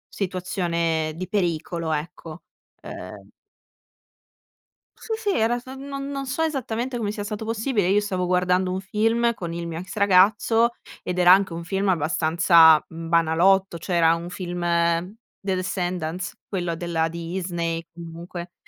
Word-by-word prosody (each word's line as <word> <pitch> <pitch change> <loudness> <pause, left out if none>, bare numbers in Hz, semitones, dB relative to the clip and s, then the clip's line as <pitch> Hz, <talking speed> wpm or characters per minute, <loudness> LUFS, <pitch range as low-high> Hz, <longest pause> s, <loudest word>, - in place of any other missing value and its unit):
situazione 170 -4 -1
di 185 +1 -4
pericolo, 170 -3 -1
ecco. 160 +1 -5 0.4
Uhm - - -9 1.7
Sì, - - -10
sì, 440 -2 -2
era 235 +2 +1
so 260 +2 -10
non 275 0 -6
non 275 -1 -4
so 265 +4 -3
esattamente 260 -5 -2
come 210 -3 -2
sia 210 -1 -5
stato 210 +1 -5
possibile. 225 -2 0
Io 200 +2 +4
stavo 190 -3 -2
guardando 180 +1 +1
un 185 - -2
film 225 +4 +1
con 175 -6 -6
il 170 0 -4
mio 165 -1 -5
ex 185 +2 -8
ragazzo 205 +4 +4 0.3
ed 180 0 -3
era 180 0 +7
anche 190 -1 +3
un 170 +1 -5
film 195 +2 0
abbastanza 160 -1 +5
banalotto, 170 +3 +2
cioè, 175 +2 -2
era 165 -1 +5
un 170 +1 -6
film 175 -1 -5 0.8
The 195 -1 -1
Descendance, 180 -1 -3
quello 175 -4 -2
della 165 -1 -1
Disney 170 0 -3
comunque, 170 +1 -8
180 Hz, 140 wpm, -24 LUFS, 170-205 Hz, 1.7 s, era